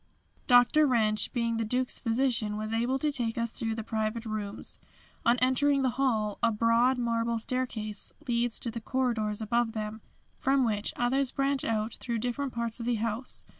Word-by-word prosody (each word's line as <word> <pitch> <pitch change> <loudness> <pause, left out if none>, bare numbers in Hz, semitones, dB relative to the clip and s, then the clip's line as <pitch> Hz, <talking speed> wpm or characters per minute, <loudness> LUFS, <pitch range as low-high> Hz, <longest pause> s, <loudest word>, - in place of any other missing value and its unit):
Dr. 250 +5 +6
Wrench, 215 -4 +2
being 230 -2 -1
the 225 - 0
Duke's 250 +3 0
physician, 230 -3 0
was 215 +1 -4
able 240 +4 +1
to 300 +2 0
take 240 -5 +1
us 230 -1 -1
through 225 -3 -2
the 225 - -4
private 220 +1 -2
rooms. 215 -1 -5 0.5
On 240 +1 +5
entering 270 +2 +2
the 260 - +2
Hall, 230 -5 0
a 235 - +3
broad 230 +4 +3
marble 230 -1 0
staircase 225 -3 -2 0.2
leads 235 -1 0
to 235 - +2
the 230 0 -6
corridors 225 -4 -1
above, 230 +1 0 0.6
from 270 -1 +2
which 210 -2 -1
others 260 +2 +2
branch 275 0 0
out 220 0 -1
through 235 -2 -2
different 250 +4 -2
parts 235 0 -2
of 235 - -5
the 245 - +2
house. 230 +3 -3
235 Hz, 170 wpm, -29 LUFS, 220-255 Hz, 0.6 s, Dr